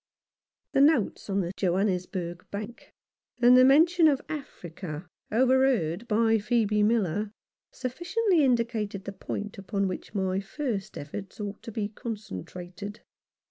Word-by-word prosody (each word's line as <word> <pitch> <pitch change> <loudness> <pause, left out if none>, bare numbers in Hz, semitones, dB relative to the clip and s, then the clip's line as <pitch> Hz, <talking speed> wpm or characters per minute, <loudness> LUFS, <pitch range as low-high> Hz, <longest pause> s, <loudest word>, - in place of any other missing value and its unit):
The 275 - +3
notes 280 -9 +3
on 195 0 +1
the 175 -1 -3
Johannesburg 180 -2 -1
Bank, 215 +4 -7 0.5
and 245 +1 +7
the 255 - +8
mention 325 +5 +6
of 280 -3 +3
Africa 180 - -6 0.3
overheard 245 -6 +2
by 225 +1 +3
Phcebe 215 -1 +2
Miller, 210 -2 +1 0.4
sufficiently 345 - +1
indicated 230 -6 0
the 200 - -4
point 205 +1 -5
upon 195 0 -1
which 185 +3 -6
my 190 -1 0
first 210 -1 -4
efforts 185 +9 -7
ought 205 -1 -5
to 230 - -8
be 210 -1 -2
concentrated. 205 - -7
210 Hz, 125 wpm, -28 LUFS, 190-250 Hz, 0.5 s, the